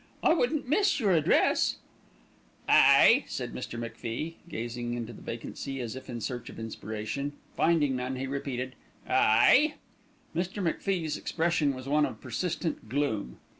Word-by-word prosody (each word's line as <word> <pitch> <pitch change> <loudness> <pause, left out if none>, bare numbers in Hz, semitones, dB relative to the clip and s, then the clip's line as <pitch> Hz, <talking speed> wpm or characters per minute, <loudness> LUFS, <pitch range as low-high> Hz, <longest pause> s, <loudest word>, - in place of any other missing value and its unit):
"I - - +5
wouldn't 295 -3 0
miss 385 +5 +2
your 210 -6 +2
address." 160 -4 +3 0.9
"Aye!" - - +7
said - - -5
Mr. 120 - -6
MacFie, 115 +7 -5
gazing 120 0 -4
into 120 -1 -5
vacancy 130 +5 -6
as 120 -1 -4
if 130 0 -9
in 120 -1 -4
search 120 +2 -4
of - - -11
inspiration. 110 +5 -4 0.2
Finding 150 -6 +2
none, 125 +1 -3
he 130 +1 -3
repeated 130 -2 -4 0.3
"Aye!" 255 - +5 0.6
Mr. 180 +4 -2
MacFie's 170 -2 -1
expression 160 -4 0
was 130 +1 -8
one 150 +1 +3
of - - -9
persistent 170 -9 -3
gloom. 110 - -1
135 Hz, 135 wpm, -29 LUFS, 120-165 Hz, 0.9 s, Aye